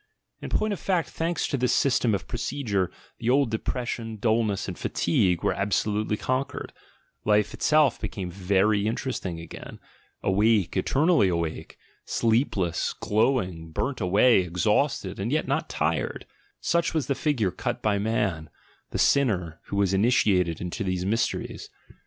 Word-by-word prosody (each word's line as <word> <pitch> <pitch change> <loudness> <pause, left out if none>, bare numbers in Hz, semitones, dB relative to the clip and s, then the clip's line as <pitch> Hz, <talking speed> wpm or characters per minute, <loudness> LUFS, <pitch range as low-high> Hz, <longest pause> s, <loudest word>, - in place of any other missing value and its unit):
In - - -6
point 215 -1 +1
of 190 - -5
fact, 175 -4 0
thanks 165 +1 -1
to 140 - -1
this 125 -1 +1
system 120 -5 +2
of 95 - -5
procedure, 115 -6 -1 0.3
the 115 - -1
old 135 -2 +3
depression, 115 0 -3
dullness, 110 -2 0
and 95 - -4
fatigue 90 0 +1
were - - +2
absolutely 105 +2 0
con 130 +4 0
quered, - - -8 0.5
life 105 0 +2
itself 150 -2 +3
became 95 -4 -4
very 100 +3 +2
interesting 110 -7 -3
again, 80 - -9 0.5
awake, 105 0 +2
eternally 155 - +3
awake, 85 -3 -3 0.3
sleepless, 110 - 0
glowing, 100 -7 0
burnt 130 - -3
away, 100 +5 +5
exhausted 90 -1 0
and - - -2
yet - - 0
not - - -1
tired - - -1 0.2
— - - -42
such 170 0 +1
was 155 -5 +1
the 140 - 0
figure 130 - 0
cut - - -4
by 105 -2 +2
man, 100 -7 -1 0.4
"the - - -4
sinner," 95 - +2
who - - -5
was 100 -1 +2
initiated 95 -6 +2
into 90 +4 -4
these 90 -1 -2
mysteries. 110 +4 -2
105 Hz, 145 wpm, -26 LUFS, 95-125 Hz, 0.5 s, away